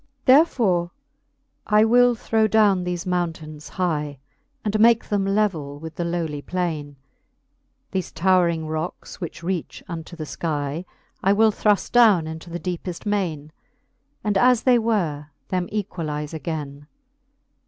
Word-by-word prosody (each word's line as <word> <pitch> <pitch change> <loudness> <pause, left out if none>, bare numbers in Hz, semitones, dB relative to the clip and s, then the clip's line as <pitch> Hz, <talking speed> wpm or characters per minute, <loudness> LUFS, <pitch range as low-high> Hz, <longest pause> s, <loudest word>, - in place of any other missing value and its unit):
Therefore 235 - +4 0.8
I 210 +1 +5
will 245 +1 +5
throw 220 0 +1
downe 205 -4 +3
thefe 180 +1 -3
mountaines 165 -4 -3
hie, 150 -6 -2 0.5
And 210 0 0
make 230 +1 +5
them 200 -2 0
levell 190 -9 0
with 160 +1 -8
the 175 - -3
lowly 165 -4 -2
plaine: 155 -5 -3 1.0
1 190 - 0
hefe - - -13
towring 170 -2 +2
rocks, 160 +5 -5
which 170 0 -6
reach 175 -2 -4
unto 170 0 -7
the 160 - -6
skie, 150 +1 -3 0.4
I 195 - +3
will 220 +1 +4
thru 210 0 +3
ft 200 - -5
downe 215 -9 +5
into 160 +2 -8
the 170 +1 -5
deepeft 180 0 -5
maine. 170 -8 -2 0.7
And 205 -2 +1
as 250 0 +4
they 250 -2 +5
were, 175 -11 -1 0.2
them 180 -1 -1
equalize 160 -7 -4
againe. 145 -2 -5
175 Hz, 140 wpm, -23 LUFS, 160-210 Hz, 1.0 s, I